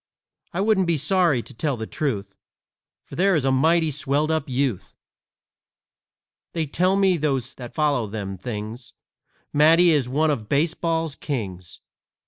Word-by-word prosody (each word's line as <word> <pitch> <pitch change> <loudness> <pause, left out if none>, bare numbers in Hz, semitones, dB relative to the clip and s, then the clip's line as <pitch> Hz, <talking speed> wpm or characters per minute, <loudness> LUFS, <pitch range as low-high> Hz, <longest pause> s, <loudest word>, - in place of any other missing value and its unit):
I 180 - -2
wouldn't 200 -3 +2
be 170 -2 +2
sorry, 170 - +2
to - - -11
tell 140 +2 -2
the 110 - -4
truth, 105 -8 -3 0.7
For - - -10
there 190 +1 +3
is 145 -4 0
a 135 - +3
mighty 160 +4 +3
swelled 145 +2 0
up 160 -3 -1
youth! 130 -6 -2 1.6
They 165 -2 -1
tell 180 +6 +1
me, 195 -2 +3
those 140 -5 -1
that 120 -2 -10
follows 140 -9 0
them 100 -3 -4
things, 110 +3 -7 0.6
Matty 165 +4 +6
is 140 -6 +2
one 155 +4 +2
of 110 -7 -4
baseball's 165 +1 0
kings. 95 - -6
145 Hz, 145 wpm, -23 LUFS, 120-165 Hz, 1.6 s, Matty